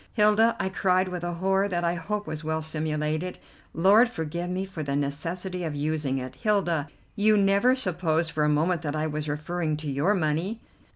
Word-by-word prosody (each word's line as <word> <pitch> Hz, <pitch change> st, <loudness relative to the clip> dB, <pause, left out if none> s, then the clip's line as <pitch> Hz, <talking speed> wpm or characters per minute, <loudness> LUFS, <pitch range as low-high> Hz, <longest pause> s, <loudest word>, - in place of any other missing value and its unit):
"Hilda," 220 Hz, +1 st, +4 dB
I 190 Hz, -, 0 dB
cried, 185 Hz, 0 st, +1 dB
with 180 Hz, -1 st, -5 dB
a 175 Hz, 0 st, -2 dB
horror 195 Hz, +3 st, +1 dB
that 175 Hz, -3 st, -2 dB
I 170 Hz, 0 st, +1 dB
hope 205 Hz, +5 st, -3 dB
was 155 Hz, 0 st, -5 dB
well 160 Hz, 0 st, -2 dB
simulated, 155 Hz, +2 st, -2 dB, 0.3 s
Lord 205 Hz, +8 st, +5 dB
forgive 170 Hz, -4 st, -4 dB
me 185 Hz, +1 st, -2 dB
for 185 Hz, -4 st, -7 dB
the 140 Hz, -2 st, -2 dB
necessity 175 Hz, +6 st, -3 dB
of 155 Hz, -3 st, -3 dB
using 150 Hz, -2 st, -1 dB
it, 130 Hz, 0 st, -6 dB
"Hilda, 175 Hz, -8 st, +1 dB, 0.3 s
you 215 Hz, 0 st, +4 dB
never 200 Hz, +6 st, +4 dB
supposed 170 Hz, -7 st, 0 dB
for 150 Hz, -1 st, 0 dB
a 150 Hz, -, +3 dB
moment 160 Hz, +3 st, +1 dB
that 150 Hz, -2 st, -3 dB
I 155 Hz, 0 st, 0 dB
was 150 Hz, -1 st, -3 dB
referring 155 Hz, +1 st, -2 dB
to 150 Hz, -2 st, -4 dB
your 150 Hz, +10 st, +2 dB
money?" 175 Hz, +6 st, -1 dB
170 Hz, 190 wpm, -26 LUFS, 155-190 Hz, 0.3 s, Lord